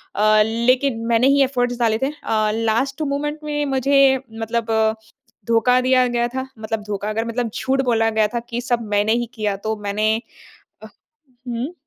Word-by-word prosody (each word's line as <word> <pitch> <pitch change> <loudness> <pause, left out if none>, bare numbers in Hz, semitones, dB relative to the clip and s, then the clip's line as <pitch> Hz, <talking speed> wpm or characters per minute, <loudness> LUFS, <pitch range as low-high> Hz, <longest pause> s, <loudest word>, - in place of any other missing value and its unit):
अ, 215 +1 +4
लेकिन 235 +1 +1
मैंने 235 +2 +3
ही - - +4
एफ़र्ट्स 245 -2 -1
डाले 225 -2 +2
थे। 280 - 0
अ, 215 -1 +1
लास्ट 230 +6 -1
मोमेंट 295 +1 -2
में 295 -1 -2
मुझे 270 0 +4 0.2
मतलब 225 0 -2 0.8
धोखा 235 +2 +3
दिया 255 0 +3
गया 240 0 0
था, 260 +1 -4
मतलब 220 -1 -4
धोखा 205 0 -4
अगर 225 +1 -2
मतलब 230 0 -2
झूठ 270 +1 0
बोला 225 -2 +2
गया 215 -1 +2
था 235 - +1
कि 240 +1 -3
सब 240 -1 -1
मैंने 205 +2 +2
ही 240 +1 0
किया 210 -3 -2
तो 220 - 0
मैंने, 215 +2 0 0.6
अ, - - -8 0.6
हुँ। 240 +8 -3
235 Hz, 170 wpm, -20 LUFS, 220-260 Hz, 0.8 s, अ